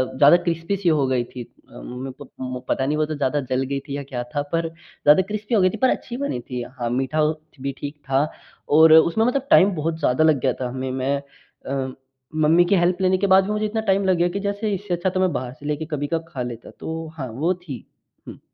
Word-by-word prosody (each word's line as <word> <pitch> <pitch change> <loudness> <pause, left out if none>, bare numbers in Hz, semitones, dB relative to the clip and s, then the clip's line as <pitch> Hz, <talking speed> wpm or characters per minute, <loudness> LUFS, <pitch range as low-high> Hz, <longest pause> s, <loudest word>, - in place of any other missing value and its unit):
ज़्यादा 145 +6 +7
क्रिस्पी 170 +1 -2
सी 185 -3 +1
हो 150 -4 +3
गई 125 -2 +1
थी। 125 0 -8
अ, - - -22
मेरे 130 - -6
को 135 +1 -13 0.2
मो 125 0 -4
पता 130 - +1
नहीं 150 +2 0
वो 155 - +2
तो 155 0 -4
ज़्यादा 145 0 0
जल 130 +1 +1
गई 140 - 0
थी 140 - -4
या 140 - -5
क्या 125 -3 -5
था 145 - +2
पर 165 0 0
ज़्यादा 165 0 +2
क्रिस्पी 210 +2 -2
हो 205 - +4
गई 185 - +5
थी - - -5
पर - - +5
अच्छी 240 -1 -3
बनी 125 - -2
थी। 125 0 -6
हाँ, 125 -1 -5
मीठा 135 +5 0 0.4
भी 140 0 -2
ठीक 145 +1 -6
था, 135 +3 +3 0.4
और 160 +2 +7
उसमें 170 +7 +5
मतलब 270 +2 0
टाइम 200 - +7
बहुत 160 +1 -2
ज़्यादा 145 +1 +2
लग 155 -3 +4
गया 130 -1 +2
था। 125 - -1
हमें 130 +1 -4
मैं 130 +2 0 0.5
अ, 130 -1 -2 0.4
मम्मी 155 +3 +5
की 195 +3 +3
हेल्प 175 0 +2
लेने 185 0 +3
के 200 +2 0
बाद 190 0 +6
भी 200 - -3
मुझे 210 0 0
इतना 220 +1 -1
टाइम 200 -2 +2
लग 185 -2 +3
गया 175 +1 +3
कि, 190 +3 -3
जैसे 205 +1 -2
इससे 195 -1 -4
अच्छा 175 +2 0
तो 185 0 -2
मैं 185 -2 +2
बाहर 125 -1 -4
से 145 - -15
लेकर 150 +1 -2
कभी 145 0 -2
का 165 - 0
खा 145 -7 -6
लेता 120 -1 -6
तो 160 0 -5
हाँ, 135 -4 -4
वो 150 +11 0
थी। 175 -8 -9 0.4
हुँ। - - -9
155 Hz, 250 wpm, -22 LUFS, 135-185 Hz, 0.5 s, ज़्यादा